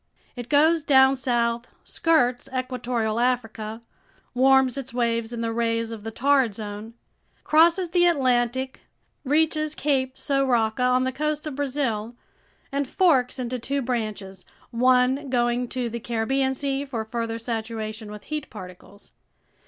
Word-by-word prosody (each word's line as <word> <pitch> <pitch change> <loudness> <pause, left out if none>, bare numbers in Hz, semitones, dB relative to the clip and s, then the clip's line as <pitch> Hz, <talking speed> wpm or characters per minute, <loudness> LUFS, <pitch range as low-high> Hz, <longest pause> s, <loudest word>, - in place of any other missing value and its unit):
It 245 -1 -7
goes 315 +3 +4
down 265 -2 +5
south, 240 -2 -1 0.2
skirts 255 -6 +1
equatorial 250 -3 -2
Africa, 225 -3 -1 0.5
warms 265 0 +4
its 265 -2 -6
waves 230 -1 0
in 235 -1 -4
the 230 0 -2
rays 230 0 -1
of 220 -2 -8
the 225 - -4
Torrid 265 -2 +2
Zone, 210 +1 -7 0.5
crosses 335 +3 +4
the 350 0 +4
Atlantic, 260 -4 +1 0.4
reaches 310 +1 +1
Cape 265 -3 0
São 275 -1 0
Roque 225 -2 +1
on 250 0 +3
the 260 - 0
coast 300 +2 -2
of 300 -3 -5
Brazil, 255 -5 -2 0.6
and 280 0 -1
forks 275 -9 +2
into 250 0 -3
two 275 +3 -2
branches, 215 -6 -4 0.3
one 255 +3 +2
going 240 0 +1
to 250 0 -3
the 235 +1 -5
Caribbean 265 +4 0
Sea 275 0 -2
for 240 -6 -4
further 230 0 -3
saturation 220 -2 -5
with 210 -1 -9
heat 305 -2 -5
particles. 190 0 -12
250 Hz, 140 wpm, -24 LUFS, 230-275 Hz, 0.6 s, down